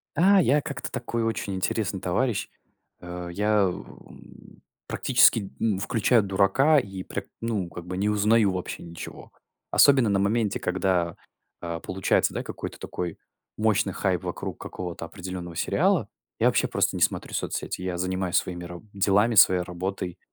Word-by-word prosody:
А, 190 Hz, +5 st, +5 dB
я 145 Hz, -1 st, +3 dB
как-то 140 Hz, -2 st, -5 dB
такой 120 Hz, -1 st, -2 dB
очень 110 Hz, -3 st, -2 dB
интересный 95 Hz, +1 st, -1 dB
товарищ, 110 Hz, +3 st, 0 dB, 0.5 s
э. 90 Hz, 0 st, -6 dB
Я, 105 Hz, +1 st, +2 dB
у, 90 Hz, -, -10 dB, 0.8 s
практически, 100 Hz, -4 st, +4 dB
м, 105 Hz, -4 st, +1 dB
включаю 115 Hz, +3 st, +2 dB
дурака 100 Hz, +11 st, +4 dB
и 95 Hz, -5 st, -6 dB
пря -, -, -5 dB, 0.2 s
ну, 110 Hz, -6 st, -2 dB
как 85 Hz, 0 st, -9 dB
бы, 90 Hz, +1 st, -5 dB
не 100 Hz, +2 st, +1 dB
узнаю 105 Hz, 0 st, +3 dB
вообще 90 Hz, -1 st, -5 dB
ничего. 85 Hz, -1 st, -9 dB, 0.4 s
Особенно 135 Hz, -6 st, +6 dB
на 100 Hz, -1 st, +2 dB
моменте, 105 Hz, +1 st, +1 dB
когда, 90 Hz, -2 st, 0 dB, 0.5 s
а, 85 Hz, -1 st, -4 dB
получается, 95 Hz, +2 st, +1 dB
да, -, -, -3 dB
какой-то -, -, -7 dB
такой 85 Hz, -2 st, -5 dB, 0.4 s
мощный 105 Hz, -3 st, +1 dB
хайп 90 Hz, -3 st, -1 dB
вокруг -, -, -5 dB
какого-то 90 Hz, -2 st, -6 dB
определенного 90 Hz, -2 st, -7 dB
сериала. -, -, +1 dB, 0.3 s
Я -, -, +4 dB
вообще -, -, +2 dB
просто -, -, 0 dB
не -, -, -5 dB
смотрю -, -, 0 dB
соцсети. -, -, -3 dB
Я 90 Hz, -1 st, -3 dB
занимаюсь 95 Hz, 0 st, -1 dB
своими 90 Hz, -1 st, -1 dB
раб 90 Hz, +2 st, -9 dB
делами, 100 Hz, +3 st, +3 dB
своей 95 Hz, -2 st, +7 dB
работой. 90 Hz, 0 st, -4 dB
95 Hz, 150 wpm, -26 LUFS, 90-110 Hz, 0.8 s, своей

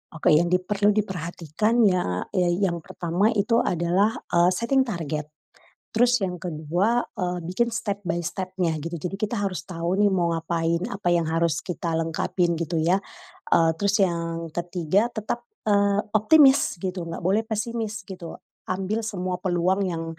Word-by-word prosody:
Oke, 160 Hz, -, +2 dB
yang 160 Hz, +3 st, +5 dB
diperlu 200 Hz, +3 st, +2 dB
diperhatikan 190 Hz, +3 st, 0 dB
ya, 180 Hz, -, +1 dB
yang 180 Hz, -1 st, +1 dB
pertama 170 Hz, +4 st, -1 dB
itu 225 Hz, +3 st, +2 dB
adalah, 180 Hz, +5 st, +1 dB, 0.2 s
eee, 175 Hz, +1 st, +4 dB
setting 260 Hz, +5 st, +1 dB
target. 155 Hz, -6 st, -3 dB, 0.7 s
Terus 240 Hz, -2 st, +3 dB
yang 180 Hz, -2 st, -4 dB
kedua, 175 Hz, +8 st, 0 dB
eee, 180 Hz, -4 st, -3 dB
bikin 185 Hz, +8 st, 0 dB
step 210 Hz, -3 st, -3 dB
by 180 Hz, -3 st, -2 dB
step-nya 185 Hz, -1 st, -2 dB
gitu. 165 Hz, +3 st, -4 dB
Jadi 180 Hz, +4 st, -5 dB
kita 215 Hz, +2 st, -1 dB
harus 195 Hz, -5 st, -2 dB
tau 170 Hz, -1 st, -2 dB
nih 205 Hz, +2 st, +4 dB
mau 175 Hz, -3 st, +1 dB
ngapain, 165 Hz, 0 st, -1 dB
apa 195 Hz, -3 st, -1 dB
yang 170 Hz, -2 st, +1 dB
harus 165 Hz, 0 st, +1 dB
kita 175 Hz, -2 st, -4 dB
lengkapin 165 Hz, +2 st, 0 dB
gitu 165 Hz, 0 st, -1 dB
ya. 170 Hz, +4 st, +3 dB, 0.6 s
Eee, 165 Hz, -1 st, +4 dB
terus 200 Hz, +3 st, +1 dB
yang 170 Hz, -2 st, -1 dB
ketiga 175 Hz, +6 st, 0 dB
tetap, 220 Hz, +2 st, -4 dB, 0.2 s
eee, 200 Hz, 0 st, +3 dB, 0.2 s
optimis 270 Hz, -, +5 dB
gitu, 185 Hz, -1 st, -3 dB
nggak 165 Hz, 0 st, -6 dB
boleh 195 Hz, +5 st, +1 dB
pesimis 220 Hz, -1 st, -3 dB
gitu. 180 Hz, -4 st, -8 dB, 0.2 s
Ambil 195 Hz, +4 st, -2 dB
semua 185 Hz, -4 st, -3 dB
peluang 185 Hz, +2 st, +1 dB
yang 165 Hz, -3 st, -2 dB
180 Hz, 150 wpm, -25 LUFS, 170-205 Hz, 0.7 s, yang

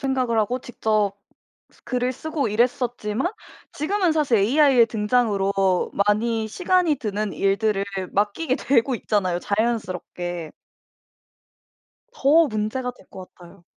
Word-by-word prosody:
생각을 255 Hz, -4 st, 0 dB
하고 240 Hz, +4 st, 0 dB
직접 215 Hz, -4 st, -1 dB, 0.7 s
글을 250 Hz, 0 st, -1 dB
쓰고 295 Hz, -2 st, -3 dB
이랬었지만 240 Hz, -, -1 dB, 0.4 s
지금은 355 Hz, +3 st, 0 dB
사실 285 Hz, -8 st, +2 dB
AI의 255 Hz, +2 st, +4 dB
등장으로 200 Hz, -4 st, +1 dB, 0.2 s
많이 220 Hz, +1 st, +1 dB
시간이 360 Hz, -, +1 dB
드는 210 Hz, -3 st, -3 dB
일들을 200 Hz, 0 st, +1 dB, 0.3 s
맡기게 230 Hz, +8 st, 0 dB
되고 255 Hz, -1 st, +1 dB
있잖아요 185 Hz, -6 st, 0 dB
자연스럽게. 180 Hz, -6 st, -3 dB, 1.6 s
더 325 Hz, -, +4 dB
문제가 220 Hz, +3 st, -2 dB
될 245 Hz, -, -21 dB
것 185 Hz, -1 st, -11 dB
같아요. 175 Hz, -1 st, -16 dB
225 Hz, 265 characters per minute, -23 LUFS, 205-260 Hz, 1.6 s, AI의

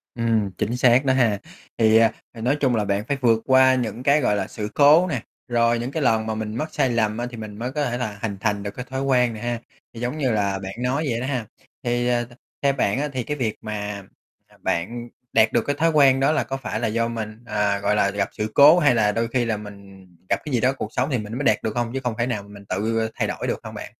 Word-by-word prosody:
Ừm, 115 Hz, -4 st, 0 dB
chính 120 Hz, +4 st, -1 dB
xác 125 Hz, +2 st, +4 dB
đó 130 Hz, -, +3 dB
ha. 115 Hz, -6 st, +2 dB, 0.4 s
Thì, 110 Hz, -1 st, +5 dB
à, 115 Hz, 0 st, +5 dB, 0.2 s
ờ, 115 Hz, -, -9 dB
nói 130 Hz, +5 st, +2 dB
chung 130 Hz, -4 st, +2 dB
là 105 Hz, -2 st, 0 dB
bạn 100 Hz, +1 st, 0 dB
phải 140 Hz, -, 0 dB
vượt 115 Hz, -2 st, +3 dB
qua 130 Hz, 0 st, +5 dB
những 125 Hz, 0 st, -3 dB
cái, 145 Hz, +2 st, +4 dB
gọi 105 Hz, -, +2 dB
là, 95 Hz, -2 st, -2 dB
sự 105 Hz, -1 st, -5 dB
cố 150 Hz, +5 st, +6 dB
nè, 130 Hz, -10 st, -2 dB, 0.3 s
rồi 120 Hz, -1 st, +2 dB
những 120 Hz, +3 st, -4 dB
cái 160 Hz, -, -2 dB
lần 110 Hz, -3 st, +2 dB
mà 110 Hz, -, -2 dB
mình 110 Hz, 0 st, -4 dB
mắc 155 Hz, +5 st, -3 dB
sai 135 Hz, -3 st, +2 dB
lầm 110 Hz, -2 st, 0 dB
á, 120 Hz, -, -2 dB
thì 120 Hz, -, -9 dB
mình 110 Hz, -1 st, -8 dB
mới 125 Hz, +2 st, -3 dB
có 150 Hz, +1 st, -1 dB
thể 120 Hz, 0 st, -2 dB
là 110 Hz, -5 st, -4 dB
hình 100 Hz, -3 st, -3 dB
thành 105 Hz, -1 st, -1 dB
được 100 Hz, -, -4 dB
cái 125 Hz, -, -6 dB
thói 130 Hz, 0 st, -3 dB
quen 125 Hz, -3 st, +2 dB
này 110 Hz, -, -8 dB
ha, 120 Hz, -1 st, -2 dB, 0.3 s
thì 115 Hz, -, -9 dB
giống 125 Hz, +5 st, -3 dB
như 135 Hz, -5 st, +1 dB
là 100 Hz, -3 st, 0 dB
bạn 95 Hz, 0 st, -6 dB
nói 140 Hz, +5 st, 0 dB
vậy 115 Hz, -1 st, -1 dB
đó 130 Hz, -, -3 dB
ha. 125 Hz, -5 st, -2 dB, 0.4 s
Thì, 120 Hz, 0 st, 0 dB
à, 120 Hz, -1 st, +1 dB, 0.4 s
theo 140 Hz, -1 st, +3 dB
bạn 125 Hz, -2 st, 0 dB
á 150 Hz, -, 0 dB
thì 125 Hz, -, -2 dB
cái 150 Hz, +4 st, -4 dB
việc 115 Hz, -5 st, -1 dB
mà, 105 Hz, -2 st, -5 dB, 0.4 s
à, -, -, -23 dB
bạn 120 Hz, +8 st, -2 dB, 0.2 s
đạt 110 Hz, 0 st, +4 dB
được 120 Hz, -, +2 dB
cái 145 Hz, -, +1 dB
thói 165 Hz, +2 st, +2 dB
quen 135 Hz, -3 st, +5 dB
đó 140 Hz, +2 st, +3 dB
là 155 Hz, -, +1 dB
có 135 Hz, -, -4 dB
phải 120 Hz, -5 st, -4 dB
là 115 Hz, -, 0 dB
do 115 Hz, +1 st, 0 dB
mình 110 Hz, -1 st, -6 dB
à, 105 Hz, -2 st, 0 dB
gọi 100 Hz, +1 st, +1 dB
là, 100 Hz, -1 st, +3 dB
gặp 100 Hz, -1 st, -1 dB
sự 105 Hz, 0 st, -4 dB
cố 150 Hz, +5 st, +8 dB
hay 145 Hz, -6 st, +4 dB
là 105 Hz, -2 st, +3 dB
đôi 115 Hz, +2 st, -1 dB
khi 120 Hz, 0 st, 0 dB
là 110 Hz, -2 st, -1 dB
mình 100 Hz, -2 st, -12 dB, 0.2 s
gặp -, -, +2 dB
cái 150 Hz, -, -4 dB
gì 120 Hz, -, +3 dB
đó 130 Hz, +2 st, +3 dB
cuộc 110 Hz, 0 st, -5 dB
sống 130 Hz, +4 st, 0 dB
thì 125 Hz, -, +1 dB
mình 110 Hz, 0 st, -6 dB
mới 135 Hz, -, -3 dB
đạt 110 Hz, -5 st, +4 dB
được 110 Hz, +1 st, -2 dB
hông, 120 Hz, -1 st, -1 dB
chứ 135 Hz, -, -1 dB
không 125 Hz, -2 st, -1 dB
phải 120 Hz, +1 st, 0 dB
nào 105 Hz, -5 st, -2 dB
mình 100 Hz, 0 st, -13 dB
tự 110 Hz, +4 st, -1 dB
thay -, -, 0 dB
đổi -, -, -4 dB
được -, -, -1 dB
hông -, -, -8 dB
bạn? -, -, -8 dB
115 Hz, 285 wpm, -23 LUFS, 105-130 Hz, 0.4 s, cố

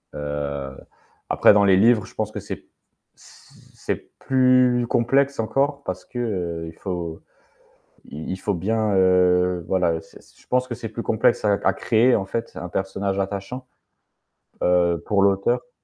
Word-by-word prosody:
heu, 70 Hz, -2 st, -4 dB, 0.6 s
après -, -, +5 dB
dans 100 Hz, 0 st, +4 dB
les 95 Hz, -1 st, +5 dB
livres, 110 Hz, 0 st, +4 dB
je -, -, -17 dB
pense 110 Hz, -1 st, -2 dB
que -, -, -5 dB
c'est -, -, -8 dB, 0.5 s
c -, -, -19 dB, 0.2 s
c'est -, -, -5 dB
plus 125 Hz, -2 st, +3 dB
complexe 135 Hz, +4 st, +2 dB
encore 140 Hz, +5 st, -1 dB
parce 95 Hz, -4 st, -5 dB
que, 125 Hz, -, -10 dB
heu, 90 Hz, -8 st, -3 dB
il 80 Hz, -, -14 dB
faut 85 Hz, -4 st, -5 dB, 0.9 s
i 75 Hz, +2 st, -8 dB
il -, -, -3 dB
faut 105 Hz, +1 st, -1 dB
bien, 105 Hz, +4 st, 0 dB
heu, 90 Hz, -1 st, +3 dB
voilà, 90 Hz, -3 st, +2 dB
heu, 80 Hz, -, -3 dB
c'est -, -, -17 dB, 0.2 s
je -, -, -24 dB
pense 125 Hz, 0 st, +1 dB
que 120 Hz, -, -4 dB
c'est 115 Hz, -1 st, -6 dB
plus 115 Hz, +1 st, -5 dB
complexe 110 Hz, 0 st, +1 dB
à 105 Hz, -1 st, +4 dB
à 95 Hz, -, +4 dB
créer, 120 Hz, +5 st, +3 dB
en 100 Hz, -, -2 dB
fait, 115 Hz, +4 st, -4 dB
un 90 Hz, -, -6 dB
personnage 95 Hz, +1 st, -2 dB
attachant, 100 Hz, +6 st, -5 dB, 1.0 s
heu, 85 Hz, -1 st, +2 dB
pour 100 Hz, -2 st, +2 dB
l'auteur. 100 Hz, +10 st, +1 dB
100 Hz, 165 wpm, -23 LUFS, 90-120 Hz, 1.0 s, après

